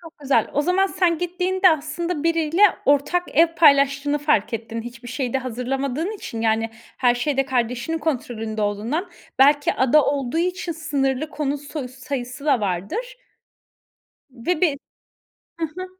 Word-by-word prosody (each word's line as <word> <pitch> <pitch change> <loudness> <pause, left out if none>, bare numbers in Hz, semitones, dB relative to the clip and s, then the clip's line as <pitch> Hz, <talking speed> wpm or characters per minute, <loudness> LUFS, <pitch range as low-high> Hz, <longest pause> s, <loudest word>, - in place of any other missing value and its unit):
Çok 330 -2 -14
güzel. 280 -2 +1
O 290 - +1
zaman 365 +4 +2
sen 355 -4 +1
gittiğinde, 365 +2 +2
aslında, 320 +1 -2
biriyle 330 +2 +1 0.2
ortak 290 +5 +2
ev 330 +1 +5
paylaştığını 280 -2 +4
fark 285 -8 +1
ettin 230 0 -5
hiçbir 240 +1 -10
şeyi 255 -1 -3
de 265 - +1
hazırlamadığın 265 - -3
için. 230 - -6
Yani, 225 0 +1 0.3
her 245 -2 +3
şeyde 270 +2 0
kardeşinin 250 +4 -1
kontrolünde 225 -8 -3
olduğundan. 225 - -2 0.3
Belki 290 +2 +5
ada 265 +3 +4
olduğu 280 +1 -1
için 355 0 -1
sınırlı 295 -2 -1
konut 290 -2 -2
so 285 -2 -6
sayısı 255 +1 -6
da 275 -6 +3
vardır. 215 - -3 1.2
Ve 275 +7 -2
bir 310 -6 +2 0.8
Hı - - +1
hı. 360 +4 -7
285 Hz, 145 wpm, -22 LUFS, 245-330 Hz, 1.2 s, ev